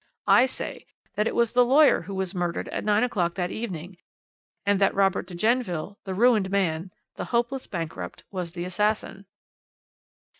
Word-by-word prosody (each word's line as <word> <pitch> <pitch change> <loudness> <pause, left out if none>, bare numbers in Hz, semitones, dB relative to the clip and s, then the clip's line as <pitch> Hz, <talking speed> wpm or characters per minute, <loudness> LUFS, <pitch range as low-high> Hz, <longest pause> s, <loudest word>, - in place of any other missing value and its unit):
I 255 - +6
say - - -7 0.3
that 210 +2 0
it - - -2
was 235 -1 +2
the 250 0 +6
lawyer 280 +4 +5
who 195 +3 -7
was 190 -1 -2
murdered 175 -2 -2
at - - -3
nine 210 +1 +3
o'clock 180 -9 0
that 180 -1 -2
evening, 185 -5 -6 0.7
and 200 -1 +2
that 195 - +3
Robert 195 -2 +2
de 180 - -8
Genneville, 205 -3 0
the 190 -1 -4
ruined 220 -3 +4
man, 185 -2 0 0.3
the - - -3
hopeless 245 +2 -1
bankrupt, 160 - -5
was 180 -4 -4
the 175 -1 -4
assassin." 200 +1 -1
195 Hz, 165 wpm, -26 LUFS, 180-225 Hz, 0.7 s, I